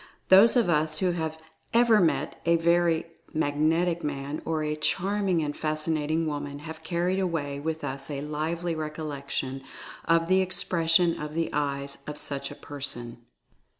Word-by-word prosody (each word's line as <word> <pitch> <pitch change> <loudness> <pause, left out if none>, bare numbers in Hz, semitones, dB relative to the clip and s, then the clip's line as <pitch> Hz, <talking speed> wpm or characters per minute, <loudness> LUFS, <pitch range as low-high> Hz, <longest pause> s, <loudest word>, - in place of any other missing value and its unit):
Those 195 +6 +8
of 240 -5 +4
us 155 -2 +2
who 185 -2 +1
have 160 -2 -3 0.4
ever 235 -2 +6
met 150 -4 0
a 170 0 +4
very 170 0 +2 0.3
"mag 145 -2 +1
netic" 165 +3 +2
man, 145 +1 -3
or 160 -1 -1
a 150 0 -1
"charming 185 +2 +1
and 145 -1 -3
fascinating" 155 +1 -1
woman, 145 -2 -4
have 160 +2 -9
carried 175 +3 0
away 155 -7 -2
with 160 +2 -3
us 135 +1 -4
a 140 -2 -3
lively 160 +3 -2
recollection 145 -4 -4 0.4
of 165 0 +3
"the 190 +1 +4
expression 170 -2 +3
of 150 0 -6
the 165 0 -1
eyes" 140 -1 -2
of 150 0 -5
such 140 -1 -4
a - - -9
person. 120 -5 -5
155 Hz, 155 wpm, -27 LUFS, 145-170 Hz, 0.4 s, Those